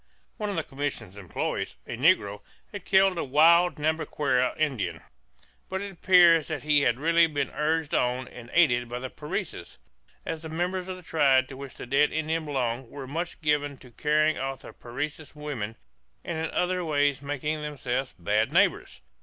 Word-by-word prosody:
One 210 Hz, -1 st, -3 dB
of 200 Hz, -, -3 dB
the 165 Hz, -, -1 dB
commission's 135 Hz, -9 st, -5 dB
employees, 95 Hz, -5 st, -3 dB
a -, -, -5 dB
negro, 115 Hz, -, +2 dB, 0.3 s
had 205 Hz, -4 st, -8 dB
killed 190 Hz, -2 st, +4 dB
a -, -, 0 dB
wild 165 Hz, +6 st, +5 dB
Nhambiquara 150 Hz, -5 st, 0 dB
Indian; 130 Hz, -, -1 dB, 0.7 s
but 190 Hz, -, -2 dB
it 200 Hz, 0 st, -5 dB
appeared 175 Hz, -3 st, +5 dB
that 155 Hz, -3 st, -5 dB
he 150 Hz, -1 st, +3 dB
had 120 Hz, -3 st, +2 dB
really 165 Hz, +2 st, +4 dB
been 145 Hz, -3 st, -2 dB
urged 155 Hz, 0 st, -1 dB
on 125 Hz, +1 st, 0 dB
and 120 Hz, -1 st, -11 dB
aided 125 Hz, -8 st, +3 dB
by 120 Hz, -, -4 dB
the 130 Hz, +1 st, -6 dB
Parecis, 150 Hz, -, -5 dB, 0.5 s
as 160 Hz, -1 st, -4 dB
the 160 Hz, -, -7 dB
members 180 Hz, +3 st, -2 dB
of 185 Hz, -1 st, -5 dB
the 180 Hz, -, -13 dB
tribe 140 Hz, -5 st, +3 dB
to 135 Hz, -, -8 dB
which 135 Hz, 0 st, -9 dB
the -, -, -8 dB
dead 140 Hz, +4 st, +3 dB
Indian 160 Hz, +1 st, -1 dB
belonged 130 Hz, -4 st, -2 dB
were 140 Hz, -2 st, -8 dB
much 165 Hz, +7 st, -5 dB
given 145 Hz, -2 st, 0 dB
to 125 Hz, -, -16 dB
carrying 155 Hz, +4 st, +1 dB
off 135 Hz, 0 st, -4 dB
the -, -, -10 dB
Parecis 150 Hz, +6 st, -6 dB
women 130 Hz, -8 st, -5 dB, 0.5 s
and 170 Hz, -, -4 dB
in 160 Hz, 0 st, -2 dB
other 180 Hz, 0 st, 0 dB
ways 145 Hz, -3 st, +1 dB
making 145 Hz, +2 st, -3 dB
themselves 135 Hz, -3 st, -3 dB
bad 85 Hz, -, +1 dB
neighbors. -, -, +1 dB
150 Hz, 180 wpm, -27 LUFS, 130-165 Hz, 0.7 s, wild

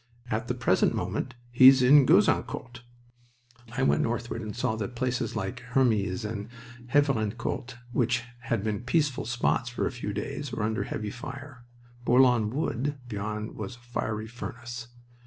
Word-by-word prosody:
"At 110 Hz, +3 st, -1 dB
the 125 Hz, -, -1 dB
present 120 Hz, -1 st, +2 dB
moment -, -, -3 dB, 0.2 s
he's 130 Hz, +1 st, +8 dB
in 135 Hz, +1 st, +7 dB
Gouzeaucourt." 120 Hz, 0 st, +2 dB, 0.9 s
I 135 Hz, +2 st, 0 dB
went -, -, +3 dB
northward, 115 Hz, 0 st, -2 dB
and 105 Hz, -1 st, -6 dB
saw 125 Hz, -1 st, 0 dB
that 110 Hz, +3 st, -4 dB
places 125 Hz, -1 st, -1 dB
like 95 Hz, 0 st, -3 dB
Hermies 115 Hz, -5 st, +1 dB
and 105 Hz, 0 st, -4 dB, 0.4 s
Havrincourt, 120 Hz, -2 st, 0 dB, 0.2 s
which 120 Hz, -1 st, +1 dB, 0.2 s
had 115 Hz, -4 st, -2 dB
been 110 Hz, 0 st, -1 dB
peaceful 140 Hz, 0 st, 0 dB
spots 120 Hz, 0 st, 0 dB
for 120 Hz, -, -2 dB
a -, -, -1 dB
few 120 Hz, -4 st, -4 dB
days, 140 Hz, +7 st, -4 dB
were 105 Hz, -, -2 dB
under 110 Hz, +1 st, -1 dB
heavy 105 Hz, -1 st, -4 dB
fire. 130 Hz, +1 st, -9 dB, 0.4 s
Bourlon 120 Hz, -3 st, +4 dB
Wood 140 Hz, +2 st, -2 dB
beyond 105 Hz, 0 st, -4 dB
was 105 Hz, +1 st, -6 dB
a -, -, -19 dB
fiery 110 Hz, -3 st, -3 dB
furnace. 120 Hz, 0 st, -7 dB
120 Hz, 150 wpm, -28 LUFS, 110-125 Hz, 0.9 s, he's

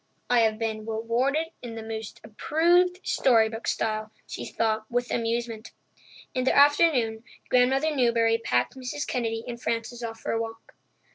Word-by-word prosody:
"I've 225 Hz, -3 st, +3 dB
been 220 Hz, -1 st, -3 dB
'rewarded' 245 Hz, +8 st, 0 dB
in 235 Hz, -2 st, -7 dB
the 225 Hz, -, -6 dB
most 220 Hz, -1 st, -7 dB
approved 345 Hz, -, +2 dB
storybook 225 Hz, -2 st, +2 dB
style," 215 Hz, 0 st, -1 dB
she -, -, -6 dB
thought 220 Hz, -1 st, -1 dB
with 245 Hz, 0 st, -1 dB
amusement. 230 Hz, -1 st, -2 dB, 0.6 s
In 255 Hz, -, 0 dB
the 260 Hz, -, +2 dB
afternoon, 280 Hz, -6 st, +4 dB, 0.3 s
Grandmother 270 Hz, +5 st, +3 dB
Newbury 230 Hz, -3 st, +3 dB
packed 125 Hz, -, 0 dB
Mrs. 260 Hz, +3 st, -4 dB
Kennedy 225 Hz, -2 st, -2 dB
and 235 Hz, 0 st, -6 dB
Frances 230 Hz, +1 st, -3 dB
off 225 Hz, -1 st, -6 dB
for -, -, -3 dB
a 225 Hz, -, 0 dB
walk. 225 Hz, 0 st, -8 dB
230 Hz, 145 wpm, -26 LUFS, 225-255 Hz, 0.6 s, afternoon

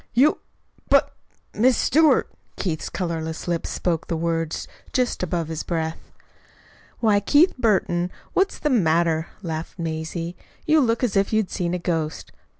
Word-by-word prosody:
"You! 280 Hz, +6 st, +4 dB, 0.5 s
but -, -, +4 dB, 0.4 s
Miss 245 Hz, +3 st, +3 dB
Stewart!" 310 Hz, +2 st, +4 dB, 0.3 s
Keith's 160 Hz, -5 st, -3 dB
colorless 165 Hz, -3 st, -4 dB
lips 170 Hz, -1 st, -1 dB
spoke 175 Hz, -1 st, -1 dB
the 165 Hz, -, -1 dB
words 165 Hz, -1 st, -2 dB, 0.3 s
just 250 Hz, -1 st, 0 dB
above 170 Hz, -2 st, -1 dB
his 160 Hz, -1 st, -4 dB
breath. 160 Hz, -2 st, -4 dB, 0.9 s
"Why, 215 Hz, -3 st, +4 dB
Keith 290 Hz, -, +4 dB
Burton, 185 Hz, -7 st, +1 dB, 0.2 s
what's 390 Hz, +1 st, +1 dB
the 300 Hz, -, 0 dB
matter?" 165 Hz, -6 st, +2 dB, 0.2 s
laughed 165 Hz, 0 st, -5 dB
Mazie. 165 Hz, +1 st, -4 dB, 0.3 s
"You 310 Hz, 0 st, +5 dB
look 230 Hz, -1 st, +1 dB
as 235 Hz, -5 st, +1 dB
if 195 Hz, 0 st, +2 dB
you'd 215 Hz, -3 st, +1 dB
seen 175 Hz, 0 st, -1 dB
a -, -, 0 dB
ghost. 165 Hz, -3 st, -3 dB
175 Hz, 145 wpm, -23 LUFS, 165-225 Hz, 0.9 s, You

